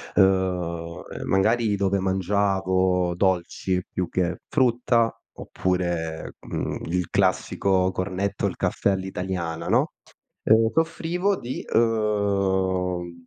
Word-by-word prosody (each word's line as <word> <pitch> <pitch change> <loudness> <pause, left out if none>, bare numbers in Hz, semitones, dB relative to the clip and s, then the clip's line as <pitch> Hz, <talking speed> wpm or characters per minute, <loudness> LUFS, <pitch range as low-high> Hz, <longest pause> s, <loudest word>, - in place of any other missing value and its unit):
uhm 90 -3 +1
ehm, - - -6
magari 110 +2 +2
dove 100 0 +1
mangiavo 95 -1 +1
dolci 90 0 0
più 90 -2 -2
che 90 -2 -1
frutta 120 -3 +2 0.3
oppure, 85 -3 -2
mhmm, - - -4
il 90 0 -1
classico 95 -1 +1
cornetto, 95 +2 -2
il - - -1
caffè 100 - +1
all'italiana, 90 -3 -3
no, - - +2 0.8
soffrivo 170 +4 0
di 125 +2 -5
uhm 95 -6 0
95 Hz, 95 wpm, -24 LUFS, 90-100 Hz, 0.8 s, magari